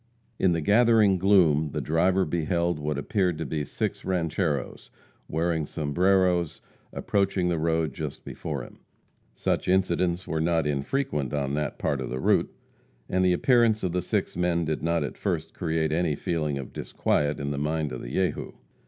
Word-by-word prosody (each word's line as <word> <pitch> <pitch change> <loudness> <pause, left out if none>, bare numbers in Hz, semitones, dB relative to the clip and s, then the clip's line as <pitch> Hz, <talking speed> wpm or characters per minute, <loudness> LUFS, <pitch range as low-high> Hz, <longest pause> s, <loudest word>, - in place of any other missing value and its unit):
In 90 -2 +3
the 85 - -1
gathering 105 0 +4
gloom, 80 -7 +4
the - - -1
driver 90 +4 +2
beheld 85 +1 0
what 75 -1 -2
appeared 90 +2 0
to - - -3
be 75 -2 -2
six - - -3
rancheros, 80 -5 -2 0.4
wearing 80 -2 0
sombreros, 90 +2 +1 0.3
approaching 95 -3 0
the 85 -2 0
road 80 -3 0
just - - -6
before 70 -5 -5
him. - - -14 0.6
Such - - -1
incidents 90 -1 +1
were 80 -1 -1
not 80 -1 +1
infrequent 75 - -1
on 70 -1 -1
that 75 -1 -2
part 70 -2 -1
of 65 - -4
the 65 - -3
route, - - +2 0.6
and 95 0 +1
the 90 -1 +4
appearance 115 +2 +3
of 90 - 0
the 90 +1 0
six - - -2
men 85 -1 +1
did 75 0 -2
not 85 +1 +1
at - - -6
first 80 -4 -2
create 80 -3 -1
any 80 -1 +1
feeling 75 -2 -2
of 65 -2 -7
disquiet 75 0 -1
in 70 0 -3
the 70 - -2
mind 75 0 -1
of 65 - -5
the - - -7
Jehu. 95 +4 -1
85 Hz, 170 wpm, -26 LUFS, 75-90 Hz, 0.6 s, gathering